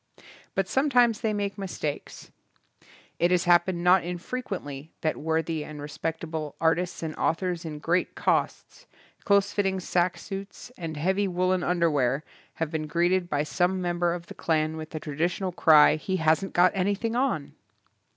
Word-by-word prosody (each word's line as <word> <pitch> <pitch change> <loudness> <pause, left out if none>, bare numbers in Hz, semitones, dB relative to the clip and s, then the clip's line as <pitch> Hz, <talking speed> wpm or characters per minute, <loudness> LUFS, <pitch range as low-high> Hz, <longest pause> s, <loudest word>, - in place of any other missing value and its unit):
But 195 -1 +1
some 270 +7 +1
times 240 -4 +3
they 220 -2 +1
make 205 -1 -3
mistakes. 170 -6 -5 0.9
It 175 - +3
has 180 -1 +2
hap 175 0 +4
pened 185 - -1
not 180 +1 +5
infrequently 175 - -5
that 155 - 0
worthy 160 0 -1
and 150 0 -9
respectable 155 +1 -4
artists 165 +2 0
and 155 -1 -4
authors 175 0 -1
in 155 -2 -5
great 175 +4 0
coats, - - -1 0.4
close 200 -1 +3
fitting 195 -2 0
sack 180 0 0
suits, 195 +4 -8
and 165 -3 -6
heavy 190 +6 +1
woolen 185 0 +1
underwear, 150 -6 +1 0.3
have 160 -2 -3
been 155 -2 -3
greeted 175 +3 +1
by 145 0 0
some 180 +4 0
member 175 -1 0
of 170 -1 -8
the - - -10
clan 155 -1 0
with 155 -1 -7
the 155 - -5
traditional 170 +5 -2
cry, 155 -3 +6
"He 185 +5 -3
hasn't 160 +4 +1
got 180 +1 +4
an3rthing 205 +4 -1
on". 245 - -1
175 Hz, 160 wpm, -26 LUFS, 160-190 Hz, 0.9 s, cry